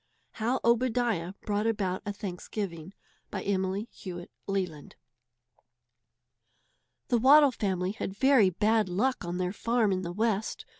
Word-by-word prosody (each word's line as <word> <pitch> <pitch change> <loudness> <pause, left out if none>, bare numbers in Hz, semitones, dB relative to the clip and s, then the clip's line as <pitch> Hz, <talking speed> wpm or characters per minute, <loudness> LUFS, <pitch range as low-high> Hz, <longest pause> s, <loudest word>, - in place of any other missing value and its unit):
HOW 240 +4 -1
OBADIAH 235 -6 +1
BROUGHT 210 +1 -1
ABOUT 195 -5 -1
A - - 0
THANKSGIVING 190 -2 -6 0.3
BY 190 - -4
EMILY 195 +2 -1
HEWITT 175 -2 -8 0.2
LELAND. 180 -7 -3 2.1
The 240 - +3
Waddle 280 +3 +7
family 190 -5 -1
had 200 -2 -5
very 265 -7 +5
bad 215 +2 +1
luck 245 +9 0
on 175 +1 -3
their 180 0 -1
farm 230 -1 +1
in 185 -1 0
the 170 -1 -4
West. 215 +2 -1
205 Hz, 130 wpm, -29 LUFS, 185-230 Hz, 2.1 s, Waddle